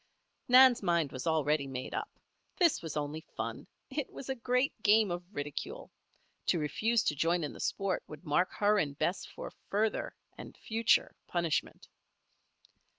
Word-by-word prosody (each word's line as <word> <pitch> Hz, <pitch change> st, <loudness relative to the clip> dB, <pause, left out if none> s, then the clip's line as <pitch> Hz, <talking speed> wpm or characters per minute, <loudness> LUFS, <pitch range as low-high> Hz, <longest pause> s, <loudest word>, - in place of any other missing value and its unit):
Nan's 255 Hz, -1 st, +7 dB
mind 170 Hz, -6 st, +1 dB
was 130 Hz, +2 st, -5 dB
already 150 Hz, -2 st, +1 dB
made 130 Hz, -1 st, -5 dB
up. -, -, -3 dB, 0.5 s
This 345 Hz, -5 st, +3 dB
was 160 Hz, -2 st, -5 dB
only 150 Hz, +2 st, -3 dB, 0.2 s
fun -, -, -4 dB, 0.2 s
it 280 Hz, 0 st, -3 dB
was 270 Hz, -, -9 dB
a 265 Hz, -, 0 dB
great 250 Hz, +2 st, +1 dB
game 215 Hz, -2 st, +4 dB
of 175 Hz, 0 st, -2 dB
ridicule. 205 Hz, -, -5 dB, 0.6 s
To 175 Hz, -, +3 dB
refuse 220 Hz, +9 st, +1 dB
to 145 Hz, -, 0 dB
join 165 Hz, +3 st, +1 dB
in 150 Hz, -, -4 dB
the -, -, -11 dB
sport 195 Hz, -2 st, -1 dB
would 150 Hz, +3 st, -11 dB
mark 165 Hz, +5 st, +2 dB
her 210 Hz, 0 st, +3 dB
and 145 Hz, -5 st, -2 dB
Bess 180 Hz, -, -1 dB
for -, -, -8 dB, 0.2 s
further, 215 Hz, +2 st, 0 dB, 0.2 s
and -, -, -10 dB
future, 225 Hz, 0 st, +2 dB
punishment. 170 Hz, -3 st, -1 dB
180 Hz, 155 wpm, -32 LUFS, 150-230 Hz, 0.6 s, Nan's